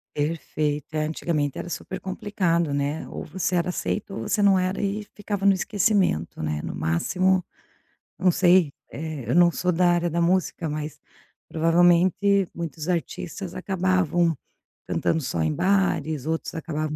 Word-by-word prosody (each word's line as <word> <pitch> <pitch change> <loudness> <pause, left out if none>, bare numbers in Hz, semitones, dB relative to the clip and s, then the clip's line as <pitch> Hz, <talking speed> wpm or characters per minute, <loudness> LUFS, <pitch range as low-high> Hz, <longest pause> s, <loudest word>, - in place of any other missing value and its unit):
Perfeito. 150 -1 -2
É, 155 0 +1
antigamente 155 -2 -1
era 175 - -5
super 190 - -5
complicado, 180 -5 -1
né, 145 +2 -2
ou - - -6
você 185 -1 -2
era 175 +1 +1
aceito 200 +2 -3
ou - - -4
você 210 - 0
não 200 -1 +5
era 185 +1 -1
e 205 +1 -1
ficava 205 -1 -3
no 200 - +7
esquecimento, 190 - +1
né, 75 -1 -2
no - - -4
máximo 180 - +1 0.7
não 185 0 +3
sei, 175 -3 +4 0.2
eh, 150 -6 -6
eu 125 - +2
não 175 0 +6
sou 180 +2 0
da 175 +1 +3
área 175 0 +2
da 170 +1 0
música, 175 -2 +1
mas 150 0 -5 0.5
provavelmente 175 +4 +3
muitos 165 -2 -5
artistas 175 +1 -3
acabavam 185 -3 +1 0.5
cantando 160 - 0
só 115 - -2
em 80 -1 +1
bares, 180 -7 +1
outros 160 0 -2
acabavam 155 -1 -3
175 Hz, 150 wpm, -25 LUFS, 155-185 Hz, 0.7 s, no